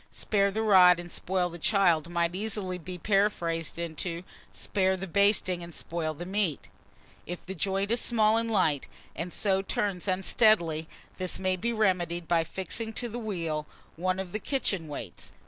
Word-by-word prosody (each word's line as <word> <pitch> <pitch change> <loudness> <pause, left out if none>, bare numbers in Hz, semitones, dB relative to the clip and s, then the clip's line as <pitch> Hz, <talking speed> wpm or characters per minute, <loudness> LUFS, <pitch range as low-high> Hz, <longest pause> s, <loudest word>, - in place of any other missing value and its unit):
"Spare 200 -2 +1
the 220 +3 -2
rod, 180 -4 +7
and 175 0 -8
spoil 180 -1 -1
the 170 - -9
child," 170 -4 +2
might 170 0 0
easily 195 -2 0
be 180 +1 -7
paraphrased 175 -4 0
into 170 +1 -4 0.3
"Spare 190 -1 0
the 190 - -5
basting, 195 -1 +3
and 170 -1 -9
spoil 160 -2 -3
the 175 - -7
meat." 190 -5 -1 0.6
If 175 0 -6
the 190 - -5
joint 195 +3 -1
is 235 - +2
small 220 -2 +3
and 230 0 +1
light, 160 -10 +2 0.3
and 170 +4 -4
so 195 0 0
turns 195 -1 -2
unsteadily, 185 -4 +3 0.3
this 185 -1 -2
may 185 -1 0
be 230 +6 -2
remedied 175 -6 0
by 170 -1 +3
fixing 190 +6 -4
to 240 +2 -2
the 235 +2 -5
wheel 165 -9 -3 0.3
one 185 +2 -1
of 190 -2 -5
the 215 - -3
kitchen 205 - 0
weights. 125 - -7
185 Hz, 170 wpm, -28 LUFS, 170-205 Hz, 0.6 s, rod